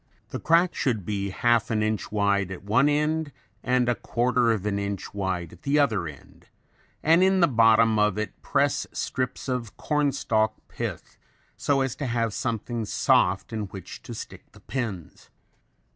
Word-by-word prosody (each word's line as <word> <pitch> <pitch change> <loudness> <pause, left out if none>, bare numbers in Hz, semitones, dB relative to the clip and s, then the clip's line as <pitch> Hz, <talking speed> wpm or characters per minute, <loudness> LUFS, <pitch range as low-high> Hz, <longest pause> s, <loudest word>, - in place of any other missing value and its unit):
The - - -5
crack 170 +2 +3
should 110 -8 -1
be 100 -1 -2
half 120 +4 +2
an 110 -1 +1
inch 110 -2 -2
wide 100 -2 +1
at 95 -1 -7
one 115 +8 +3
end 150 +1 0 0.3
and 125 0 +1
a 120 - +3
quarter 120 0 +1
of 105 -3 -1
an 100 -1 0
inch 100 -2 -4
wide 95 -4 -3
at - - -16
the 145 -1 +1
other 110 - +2
end, 70 -4 -13 0.6
and 165 +3 +5
in 190 0 +4
the 170 - +5
bottom 115 -3 +4
of 105 -1 +2
it 105 -3 -4
press - - +1
strips 130 +1 -3
of 125 -5 -3
cornstalk 140 -7 +1
pith - - -6 0.4
so 140 -1 +1
as 135 -2 -1
to 145 - -3
have 115 -2 0
something 115 -1 -2
soft 95 -1 +2
in 110 -2 -2
which 95 -2 -9
to - - -8
stick - - -10
the - - -16
pins. 110 - -5
115 Hz, 170 wpm, -26 LUFS, 100-135 Hz, 0.6 s, and